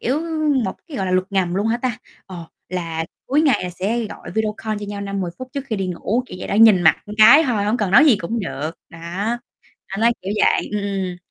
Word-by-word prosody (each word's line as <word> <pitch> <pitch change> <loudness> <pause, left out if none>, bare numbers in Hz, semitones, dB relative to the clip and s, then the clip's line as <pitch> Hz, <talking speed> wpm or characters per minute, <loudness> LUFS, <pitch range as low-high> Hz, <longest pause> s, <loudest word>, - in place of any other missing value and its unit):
kiểu, 270 +6 0 0.4
một 190 - -3
cái 310 -5 -8
gọi 190 - -2
là 185 - -1
luật 185 0 +1
ngầm 185 -3 0
luôn 200 +3 0
hả 225 +1 +1
ta, 245 -2 -3 0.3
ờ, 180 -3 -8 0.2
là 165 -3 -3 0.2
cuối 290 +4 +2
ngày 275 -9 +3
là 180 - -4
sẽ 215 +6 -2
gọi - - -10
video 215 -1 0
call 215 -1 -3
cho 205 - -6
nhau 205 0 -5
5-10 195 -3 -3
phút 255 - -7
trước 280 -1 -4
khi 220 - -2
đi 195 -1 -2
ngủ, 195 +7 -1
kiểu 180 - -9
vậy - - -6
đó, - - -1
nhìn 215 -4 +6
mặt 160 - +5
một 210 - -7
cái 240 +9 +8
thôi, 225 -7 0
hổng 210 +3 +1
cần 210 -6 -1
nói 195 - +7
gì 275 -8 +5
cũng 225 +6 -3
được. 155 -5 -4 0.2
Đó. 165 - -12 0.9
Anh 195 +2 -5
nói 235 +1 +5
kiểu 190 - -4
vậy. - - +1
Ừm, 210 -1 -1
ừm. 190 -3 -3
205 Hz, 255 wpm, -20 LUFS, 185-230 Hz, 0.9 s, cái